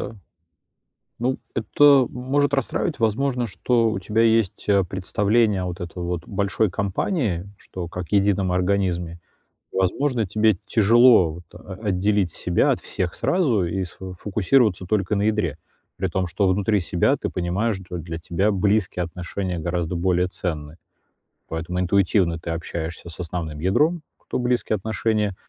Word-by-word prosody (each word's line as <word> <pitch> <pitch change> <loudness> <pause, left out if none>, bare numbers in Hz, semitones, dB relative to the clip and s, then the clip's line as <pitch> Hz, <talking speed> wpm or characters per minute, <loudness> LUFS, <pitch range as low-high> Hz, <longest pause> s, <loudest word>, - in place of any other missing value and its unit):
да. 115 - -6 1.0
Ну 130 +3 0 0.2
это 140 +3 +5
может 140 +3 0
расстраивать, 140 +4 -1
возможно, 125 +3 +1
что 115 +3 +1
у 95 - -2
тебя 105 +4 0
есть, 115 -4 +2
э, 100 -1 +4
представление 100 +2 +1
вот 90 +1 -5
это 90 +1 -6
вот 85 -1 -3
большой 100 +1 0
компании, 100 - -1
что 90 -2 -7
как 90 +1 -6
едином 100 -2 +2
организме. 90 -2 0 0.5
И - - -7
возможно, 115 +5 +1
тебе 110 +1 +2
тяжело 115 -5 +5
вот 85 - -11
о 100 - -10
отделить 100 -2 +1
себя 85 +1 +1
от - - 0
всех 90 -2 -3
сразу 135 - +1
и 95 +2 -2
сфо 95 +2 -9
фокусироваться 105 +1 +1
только 100 +1 0
на 100 - 0
ядре. 105 -8 0 0.4
При 95 - -1
том, 95 +2 -1
что 95 +3 0
внутри 100 +2 +2
себя 85 -1 +1
ты - - -4
понимаешь, 95 +4 -1
что 90 - -6
для 80 0 -5
тебя 85 +5 0
близкие 100 -2 +1
отношения 90 +1 -4
гораздо 85 +1 -2
более 90 +1 +1
ценны. 80 -5 -5 0.7
Поэтому 85 +2 -4
интуитивно 90 -2 +2
ты 85 - -7
общаешься 85 0 -5
с 80 - -11
основным 80 -3 -4
ядром, 150 - +2 0.2
кто- - - -5
близкие 125 -3 0
отношения. 105 -1 -1
95 Hz, 150 wpm, -23 LUFS, 90-110 Hz, 1.0 s, это